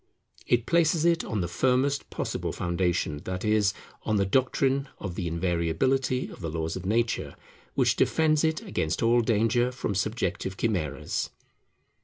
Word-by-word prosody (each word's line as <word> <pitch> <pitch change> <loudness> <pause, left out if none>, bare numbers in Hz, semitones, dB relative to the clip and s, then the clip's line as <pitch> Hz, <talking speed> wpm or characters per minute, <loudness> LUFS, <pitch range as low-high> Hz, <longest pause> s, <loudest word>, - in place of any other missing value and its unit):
It 120 -1 +2
places 165 +1 +3
it 170 -1 +3
on 105 -3 -2
the 85 - -1
firmest 130 +9 +1
possible - - -3
foundation, 85 -3 -1
that 95 +2 -3
is, 105 -2 +3 0.3
on 110 - -1
the 100 -1 +2
doctrine 135 +5 +1
of 95 -3 -5
the 90 -1 -3
invariability 90 +11 0
of - - -11
the 85 - -3
laws 80 0 -3
of 95 0 -5
nature, 115 +2 0 0.4
which - - +2
defends 155 -1 +3
it 160 -1 0
against 80 +6 -1
all 120 +1 +4
danger 115 +2 +2
from 125 -4 -3
subjective 95 -2 -2
chimeras. 90 - -1
110 Hz, 150 wpm, -27 LUFS, 90-130 Hz, 0.4 s, all